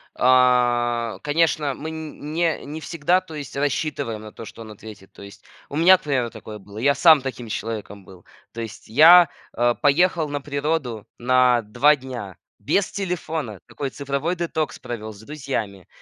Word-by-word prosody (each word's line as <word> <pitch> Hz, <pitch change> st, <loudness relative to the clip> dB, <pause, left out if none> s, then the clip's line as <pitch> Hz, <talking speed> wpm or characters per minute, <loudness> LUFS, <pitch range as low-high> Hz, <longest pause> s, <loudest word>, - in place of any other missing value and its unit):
а, 120 Hz, -2 st, +2 dB
конечно, 150 Hz, -1 st, +1 dB
мы 160 Hz, +4 st, -7 dB
не 160 Hz, +1 st, -3 dB
не 150 Hz, +2 st, -6 dB
всегда, 165 Hz, +4 st, +1 dB
то 185 Hz, -4 st, -12 dB
есть 145 Hz, -3 st, -7 dB
рассчитываем 140 Hz, -6 st, -2 dB
на 110 Hz, 0 st, -10 dB
то, 115 Hz, -, -10 dB
что 115 Hz, -, -11 dB
он 110 Hz, -1 st, -10 dB
ответит. 105 Hz, -2 st, -13 dB
То -, -, -14 dB
есть 100 Hz, 0 st, -13 dB, 0.2 s
у -, -, -8 dB
меня, 175 Hz, +4 st, +6 dB
к 185 Hz, -, -23 dB
примеру, 130 Hz, -5 st, -1 dB
такое 110 Hz, -1 st, -10 dB
было. 100 Hz, +1 st, -14 dB
Я 140 Hz, +5 st, +2 dB
сам 160 Hz, -4 st, +6 dB
таким 125 Hz, -3 st, -6 dB
человеком 105 Hz, -3 st, -6 dB
был. 90 Hz, -2 st, -16 dB, 0.3 s
То 115 Hz, -, -6 dB
есть 110 Hz, -2 st, -9 dB
я, 165 Hz, +9 st, +8 dB, 0.3 s
а, 120 Hz, +1 st, +2 dB
поехал 160 Hz, +2 st, +2 dB
на 145 Hz, 0 st, -3 dB
природу 140 Hz, -5 st, -3 dB
на 125 Hz, -1 st, +3 dB
2 145 Hz, +8 st, +3 dB
дня 125 Hz, -8 st, -8 dB, 0.2 s
без 200 Hz, -2 st, 0 dB
телефона. 160 Hz, -, -4 dB
Такой 140 Hz, -2 st, -5 dB
цифровой 140 Hz, +6 st, -3 dB
детокс 160 Hz, -3 st, -3 dB
провел 110 Hz, -2 st, -7 dB
с 100 Hz, -, -15 dB
друзьями. 110 Hz, -, -5 dB
135 Hz, 170 wpm, -22 LUFS, 115-155 Hz, 0.3 s, я